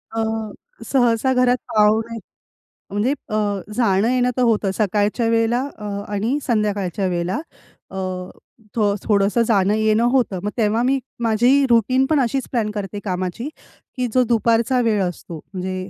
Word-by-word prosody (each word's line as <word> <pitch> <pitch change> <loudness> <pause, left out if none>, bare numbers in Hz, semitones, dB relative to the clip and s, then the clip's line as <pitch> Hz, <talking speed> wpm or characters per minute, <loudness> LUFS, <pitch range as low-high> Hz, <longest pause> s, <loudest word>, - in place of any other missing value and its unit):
अ, 225 - 0 0.6
सहसा 245 -1 +2
घरात 250 0 +3 0.2
पाहुणे 220 +2 +3 0.7
म्हणजे 205 +6 0 0.2
अ, 215 - -2 0.4
जाणं-येणं 240 +3 +2
तर - - +1
होतं, 215 -4 +2
सकाळच्या 210 +3 0
वेळेला 230 +2 +2 0.2
अ, 210 - -8 0.3
आणि 220 +7 0
संध्याकाळच्या 205 -5 0
वेळेला. 180 +6 -1 0.5
अ, 190 - -7 1.1
थोडंसं 205 +2 +2
जाणं-येणं 215 +1 +2
होतं. 245 -8 +1
मग 205 - -1
तेव्हा 220 0 +2
मी 270 +2 +2 0.2
माझी 240 +5 +3
रूटीन 250 +3 +3
पण 300 +1 +2
अशीच 265 0 0
प्लॅन 225 -4 0
करते 205 -1 -5
कामाची 185 +5 -3 0.5
की 250 -1 0
जो 255 - +4
दुपारचा 235 +2 +2
वेळ 220 -4 +1
असतो 175 -2 -5 0.2
म्हणजे 185 0 -4
225 Hz, 130 wpm, -21 LUFS, 205-245 Hz, 1.1 s, जो